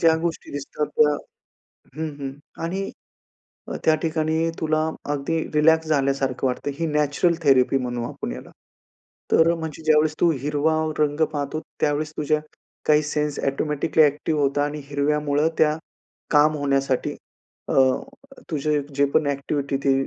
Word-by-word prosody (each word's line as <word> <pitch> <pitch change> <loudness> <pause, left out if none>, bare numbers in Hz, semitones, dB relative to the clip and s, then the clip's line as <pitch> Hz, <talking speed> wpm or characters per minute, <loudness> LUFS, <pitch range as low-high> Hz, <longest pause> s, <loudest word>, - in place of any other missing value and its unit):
ज्या 165 -1 +5
गोष्टी 170 -1 -3
दिसतात 145 +1 -3
त्या 150 -1 +5 0.8
हं, 160 0 -2
हं. 135 -1 -4 0.3
आणि 190 +4 -2 0.8
अ, - - -3
त्या 160 - +5
ठिकाणी 160 0 0
तुला 155 -1 +1 0.3
अगदी 145 +3 -1 0.2
रिलॅक्स 160 +1 +4
झाल्यासारखं 135 -3 +1
वाटतं. 130 +3 -2
ही 165 +3 -2
नॅचरल 150 +3 +2
थेरपी 135 -2 +4
म्हणू 120 -2 -3
आपण - - -5
याला. 65 - -9 0.8
तर 165 +1 +5
म्हणजे 160 -1 -6
ज्यावेळेस 155 0 +4
तू 170 - +5
हिरवा 150 +2 +1 0.2
रंग 150 0 +1
पाहतो, 145 +1 -3 0.2
त्यावेळेस 150 +1 0
तुझ्या 150 +1 +1 0.5
काही 150 0 +5
सेन्स 150 -1 -2
ऑटोमॅटिकली 150 +3 +1
अ‍ॅक्टिव्ह 150 +1 +1
होतात 140 +1 +2
आणि 150 +1 -4
हिरव्यामुळं 145 +1 +1
त्या 155 0 +4 0.5
काम 150 +1 +4
होण्यासाठी 135 -2 0 0.5
अ, - - -1 0.8
तुझं 150 0 0
जे 140 +1 +3
पण 155 - +3
अ‍ॅक्टिव्हिटी 140 0 -1
ते 135 - +4
150 Hz, 140 wpm, -23 LUFS, 140-155 Hz, 0.8 s, ज्या